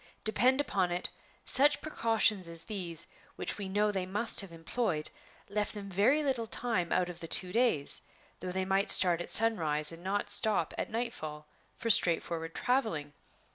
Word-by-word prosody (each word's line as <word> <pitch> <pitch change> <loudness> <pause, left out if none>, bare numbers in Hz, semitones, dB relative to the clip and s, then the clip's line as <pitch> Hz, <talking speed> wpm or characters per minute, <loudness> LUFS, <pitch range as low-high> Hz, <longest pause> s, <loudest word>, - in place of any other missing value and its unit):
Depend 255 +5 +1
upon 190 -10 -1
it, 175 +1 -3 0.4
such 290 +2 +3
precautions 225 - 0
as 165 -1 -6
these 175 -4 -6 0.3
(which - - -4
we 195 -2 -6
know 210 +2 0
they 190 -2 -4
must 210 +5 0
have 195 -3 -11
employed) 165 0 -3 0.4
left 210 +1 -4
them 200 -1 -9
very 240 +11 +1
little 255 -5 -3
time 220 -8 -2
out 180 -1 0
of 175 -1 -10
the 165 - -9
two 180 +2 +2
days 225 - 0 0.4
though 185 - -7
they 190 +1 -3
might 195 +1 -1
start 175 -2 +8
at - - -8
sunrise 160 -9 +6
and 165 +1 -12
not 200 +2 -3
stop 205 -7 +2
at - - -5
night 235 +2 -4
fall 150 -4 -9 0.3
for 230 - 0
straightforward 165 -3 +2
traveling. 220 - -2
195 Hz, 175 wpm, -29 LUFS, 170-225 Hz, 0.4 s, start